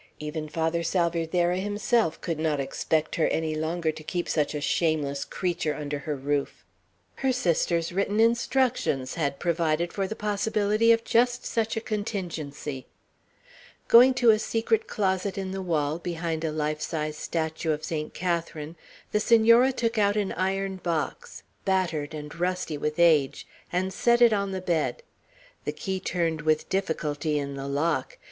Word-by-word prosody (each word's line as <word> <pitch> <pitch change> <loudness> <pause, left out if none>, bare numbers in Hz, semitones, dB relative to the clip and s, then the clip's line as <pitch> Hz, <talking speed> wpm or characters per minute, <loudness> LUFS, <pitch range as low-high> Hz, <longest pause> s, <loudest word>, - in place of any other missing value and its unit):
Even 150 0 -5
Father 165 +2 0
Salvierderra 175 +1 +1
himself 205 -2 0
could 165 -3 -3
not 155 -2 0
expect 155 +3 -1
her 160 - +3
any 160 -1 -1
longer 160 +1 -1
to 155 - -11
keep 175 +3 -3
such 150 -1 0
a - - -1
shameless 145 -2 0
creature 175 -4 -2
under 145 -1 -4
her 150 0 -3
roof. 140 +1 -2 0.5
Her 265 -1 +1
sister's 170 -7 +1
written 200 +3 0
instructions 230 - +1
had 140 -4 -1
provided 170 0 0
for 195 -1 -1
the 220 - -5
possibility 210 +1 +2
of 230 0 +3
just 245 +2 +2
such 225 0 -1
a - - -1
contingency. 165 - -4 1.0
Going 250 +2 +7
to 240 -2 +6
a 215 - +2
secret 325 - 0
closet 190 -1 -1
in 190 -1 -3
the 195 0 -4
wall, 155 -3 0
behind 165 -2 -3
a 160 - 0
life 150 0 -2
size 155 -2 -2
statue 160 0 -3
of 155 0 -2
Saint 155 -2 -4
Catharine, 170 -3 -3 0.3
the 210 - +2
Senora 230 +3 +5
took 230 -3 -1
out 205 0 +3
an 205 -2 0
iron 190 +1 -1
box, 170 -4 -3 0.2
battered 170 -6 0
and 150 -1 -7
rusty 180 -3 -1
with 150 +1 -2
age, 160 -6 +3 0.3
and 185 +2 -1
set 240 0 +3
it 235 -2 +6
on 200 -1 0
the 190 -1 -3
bed. 175 - -1 0.6
The - - 0
key 190 -1 -3
turned 165 -4 -1
with 155 0 +1
difficulty 155 -5 -1
in 140 -1 -3
the 140 0 -5
lock. 165 - -1
170 Hz, 160 wpm, -26 LUFS, 155-205 Hz, 1.0 s, Going